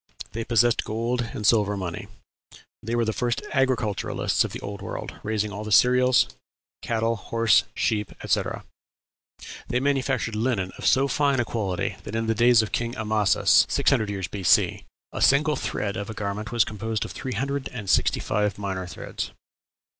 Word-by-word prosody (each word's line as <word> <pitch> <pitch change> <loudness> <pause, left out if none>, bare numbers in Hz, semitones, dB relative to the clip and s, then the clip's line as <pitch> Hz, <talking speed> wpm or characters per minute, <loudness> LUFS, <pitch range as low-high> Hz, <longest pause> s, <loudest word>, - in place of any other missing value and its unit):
They 115 +1 -4
possessed 120 0 +2
gold 115 +3 -2
and 105 - -4
silver 105 -2 +3
money. 90 -3 -5 0.7
They 115 +2 -3
were 120 -1 +1
the 110 - -1
first 120 0 -1
agriculturists 130 -6 +1
of - - -4
the - - -6
Old 100 -1 -6
World, - - -6
raising 105 -1 -2
all 105 +1 -6
the 110 - -6
cereals, 125 +3 +5 0.5
cattle, 115 0 0
horses, 115 +1 +2
sheep, 105 -2 0
etc. - - -1 1.0
They 125 - 0
manufactured 135 -4 0
linen 105 -5 -1
of - - -3
so 135 +1 +4
fine 140 -1 +1
a 120 - +1
quality 100 -7 -2
that 105 - -7
in 115 0 -1
the 115 - +1
days 120 0 +5
of 110 - -6
King 120 +1 -2
Amasis 110 -2 +3
(600 110 -2 +2
years 95 -3 -3
B.C.) 95 -4 +2 0.3
a - - -4
single 150 +3 +4
thread 100 -5 -3
of 100 +1 -5
a 110 - -6
garment 105 +1 -4
was 120 -3 +3
composed 110 0 -3
of - - -8
three 130 - -5
hundred 140 +4 -2
and 110 -5 -7
sixty - - +2
five 105 0 -1
minor 95 -2 -4
threads. - - -6
110 Hz, 170 wpm, -25 LUFS, 105-120 Hz, 1.0 s, cereals